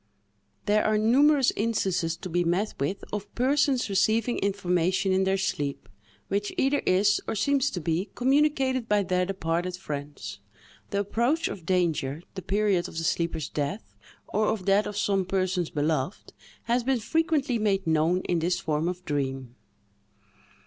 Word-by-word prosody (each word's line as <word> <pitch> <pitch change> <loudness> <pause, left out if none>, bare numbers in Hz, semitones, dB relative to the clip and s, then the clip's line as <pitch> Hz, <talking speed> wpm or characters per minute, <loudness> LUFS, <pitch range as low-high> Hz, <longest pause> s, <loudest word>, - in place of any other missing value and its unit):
_" - - -38
There 210 +1 +3
are 215 0 +2
numerous 270 +5 +4
instances 185 -7 0
to - - -7
be 175 0 0
met 180 +5 0
with 180 +9 -2
of 205 -1 -4
persons 265 0 +2
receiving 220 +4 +1
information 190 -1 +1
in 190 0 +2
their 190 0 +2
sleep, 145 -7 -2 0.4
which 205 +1 -1
either 275 +2 +2
is, 200 +3 +3
or - - -2
seems 280 +5 +2
to 180 - -4
be, 170 +4 -1
communicated 265 -2 +2
by 205 -1 +3
their 180 -1 0
departed 180 -1 -2
friends. 145 - -6 0.5
The 200 - 0
approach 240 - 0
of 170 -4 -8
danger, 165 -5 0
the 190 - -6
period 195 -1 +1
of - - -10
the 165 - -2
sleeper's 165 -2 -1
death, 150 +9 -4 0.3
or 215 0 0
of 215 -4 -1
that 200 +2 +3
of 205 - -5
some 195 -2 +1
persons 185 -2 -1
beloved, 150 +3 -2 0.3
has 240 +1 +1
been 260 0 +1
frequently 295 -1 0
made 200 -3 +1
known 160 +3 +2
in 175 -2 0
this 175 +2 0
form 155 +1 -1
of 180 0 -4
dream. 135 -4 -3
195 Hz, 160 wpm, -27 LUFS, 170-220 Hz, 0.5 s, numerous